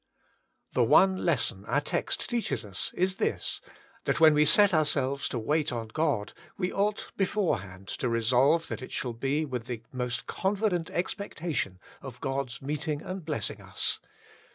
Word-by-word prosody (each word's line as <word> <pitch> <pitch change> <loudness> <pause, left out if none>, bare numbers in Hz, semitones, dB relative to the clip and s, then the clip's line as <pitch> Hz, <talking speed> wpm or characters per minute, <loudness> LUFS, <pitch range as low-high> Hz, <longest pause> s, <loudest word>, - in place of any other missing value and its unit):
The - - +4
one 190 0 +6
lesson 130 - 0
our 130 +7 +2
text 145 - -2
teaches 145 - -1
us 100 -2 -2
is 185 +1 +1
this, - - -1 0.4
that - - +1
when 160 -1 +8
we 150 0 +5
set 200 +5 +6
ourselves 140 -3 +1
to - - -3
wait 150 +6 +1
on 115 -2 -4
God 140 -7 0 0.2
we 180 -1 -1
ought 205 +1 0
beforehand 100 - -1
to 125 - 0
resolve 125 +8 +3
that - - -4
it 130 - -8
shall 125 -2 -2
be 135 +6 0
with 125 -4 -4
the 115 -3 -5
most 125 -1 -2
confident 190 -3 0
expectation 165 - -2 0.2
of 130 -3 -9
God's 135 -2 -3
meeting 150 +1 -2
and 185 -1 -5
blessing 150 -10 -3
us. - - -1
145 Hz, 155 wpm, -29 LUFS, 120-175 Hz, 0.4 s, when